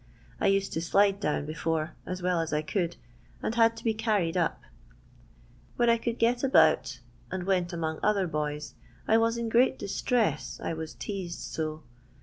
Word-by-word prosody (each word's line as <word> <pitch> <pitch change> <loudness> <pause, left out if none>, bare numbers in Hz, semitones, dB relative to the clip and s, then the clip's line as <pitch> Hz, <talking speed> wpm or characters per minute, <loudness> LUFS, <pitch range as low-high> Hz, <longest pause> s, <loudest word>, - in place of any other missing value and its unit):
I - - +2
used 195 0 +1
to 160 - -1
slide 200 +3 +3
down 150 -6 -1
before, 160 0 -2
as 185 0 -4
well 180 -1 +2
as 165 - -3
I 150 0 0
could, 175 +1 -1 0.5
and - - -1
had 230 -1 +4
to 225 - -9
be 225 - +2
carried 210 -7 0
up. 175 -3 0 1.1
When 240 -1 +4
I 230 - +2
could 235 0 -2
get 240 +2 +2
about 135 - +4 0.3
and 185 -1 -3
went 180 -2 +1
among 160 -2 -3
other 205 -2 +2
boys, 150 -2 -3 0.3
I 225 - +5
was 230 +1 +2
in 235 -1 -2
great 240 +4 +3
distress, 200 - -1
I - - -1
was 160 -1 -6
teased 190 -4 -5
so. 155 -1 -4
185 Hz, 175 wpm, -28 LUFS, 160-225 Hz, 1.1 s, I